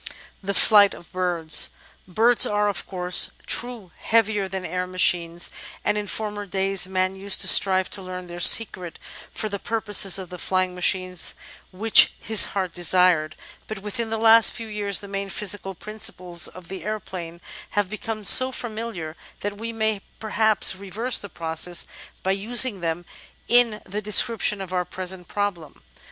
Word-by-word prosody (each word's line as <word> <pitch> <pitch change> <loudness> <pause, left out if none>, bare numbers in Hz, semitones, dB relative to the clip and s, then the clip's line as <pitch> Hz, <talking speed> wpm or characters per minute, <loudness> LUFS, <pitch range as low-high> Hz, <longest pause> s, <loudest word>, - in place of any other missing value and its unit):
§4 - - -27 0.4
The 200 0 -4
Flight 205 -1 +6
of 175 - -16
Birds 175 -4 0 0.4
Birds 225 +6 +2
are, 210 0 0
of 200 - -5
course, 180 -1 +3 0.2
true 235 -7 -1
heavier 220 -3 0
than 190 -1 -6
air 180 0 -4
machines, 175 -2 0 0.3
and 210 - +1
in 210 -1 -4
former 205 -1 -4
days 195 0 0
man 185 0 -1
used 195 0 -1
to - - +4
strive 190 -1 +5
to 200 - -1
learn 185 -1 -8
their 175 0 -9
secret 180 -3 +4 0.3
for 215 - -4
the 200 -1 -6
pur 225 +2 -3
poses 205 -3 +3
of 185 -2 -8
the 180 - -9
flying 185 0 -1
machines 180 -1 -1 0.4
which 210 +4 +4
his 220 -1 +2
heart 190 -4 -4
desired; 175 -3 +2 0.3
but 210 -3 -8
within 220 +2 -4
the 225 - -3
last 225 0 +5
few 230 - -8
years 205 -2 0
the 200 - -10
main 195 0 -5
physical 195 -1 -2
principles 180 -4 -2
of 185 -2 -13
the 190 +1 -8
aeroplane 185 -5 -7 0.4
have 205 -2 +1
become 215 +1 -6
so 255 +5 +7
familiar 220 -10 -7 0.3
that 205 0 -5
we 230 +1 -5
may 220 -2 -2 0.2
perhaps 220 -2 +1
reverse 200 +6 -2
the 200 - -9
process 165 +1 -4 0.4
by 190 - 0
using 220 +2 +3
them 170 0 -4 0.4
in 235 -3 +3
the 205 +3 -5
description 210 -1 +1
of 185 -1 -8
our 180 -1 0
present 180 0 -7
problem! 190 - -5
195 Hz, 165 wpm, -23 LUFS, 180-215 Hz, 0.4 s, so